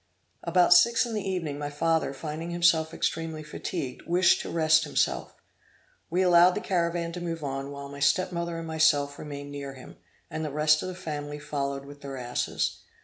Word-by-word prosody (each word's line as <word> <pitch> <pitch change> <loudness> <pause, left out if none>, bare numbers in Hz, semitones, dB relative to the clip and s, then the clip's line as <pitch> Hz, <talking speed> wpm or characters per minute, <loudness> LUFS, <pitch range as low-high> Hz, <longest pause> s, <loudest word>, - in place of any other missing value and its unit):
About 175 +1 +5
six 235 +7 +5
in 235 - -5
the 205 -3 -2
evening, 165 -6 -3
my 145 0 -3
father 160 +1 +1
finding 155 +4 -5
himself 170 -2 +3
extremely 160 -1 -2
fatigued, 135 -3 -5
wished 175 +1 +4
to - - -6
rest 160 -1 +4
himself. 150 - -1 0.7
We 180 +3 +2
allowed 180 0 +6
the - - -1
caravan 170 -2 -1
to 175 +1 -6
move 165 -2 -4
on, 135 0 -3
while 140 0 -7
my 140 0 -9
step 185 +6 +2
mother 170 -1 -3
and 165 - -5
myself 155 -3 +2
remained 145 -1 -7
near 140 -1 -6
him, 130 - -13 0.3
and 160 -1 -5
the 155 - -2
rest 150 +1 +3
of - - -4
the 185 - -5
family 150 -4 -5
followed 140 -2 -3
with 145 0 -12
their 135 -1 -6
asses. 125 -1 -2
155 Hz, 190 wpm, -27 LUFS, 145-170 Hz, 0.7 s, allowed